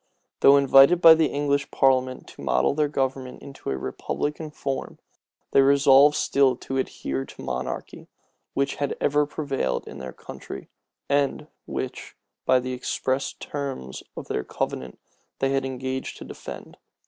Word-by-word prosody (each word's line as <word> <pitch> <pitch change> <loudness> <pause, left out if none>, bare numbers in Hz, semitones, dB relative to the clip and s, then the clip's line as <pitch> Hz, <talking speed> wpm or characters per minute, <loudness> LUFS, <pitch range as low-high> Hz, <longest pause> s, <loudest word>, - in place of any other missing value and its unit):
Though 140 +1 +7
invited 140 +5 +6
by 165 -2 +10
the 160 -1 +3
English 140 -1 0
parliament 130 -1 +1
to - - -13
model - - +2
their 150 +1 +1
government 135 -2 -3
into 135 -1 -8
a 65 - -1
republican 150 - -4
form, 140 -2 -4 0.5
they 135 - +6
resolved 140 +1 +6
still 135 -2 +3
to 135 +2 -5
adhere 65 - -2
to - - -12
monarchy, 65 0 -5 0.5
which 140 0 0
had 145 -1 -2
ever 145 0 +2
prevailed 135 - -2
in 70 - -9
their 65 -1 -6
country, - - -10 0.4
and 140 -1 +1 0.2
which, - - -5 0.3
by 130 - +5
the 130 0 -4
express 130 +1 -2
terms 135 - -6 0.2
of - - -6
their 65 - -2
covenant 65 -1 -4 0.4
they 135 0 0
had 135 -1 0
engaged 130 0 -4
to - - -9
defend. - - -9
135 Hz, 150 wpm, -25 LUFS, 130-140 Hz, 0.5 s, by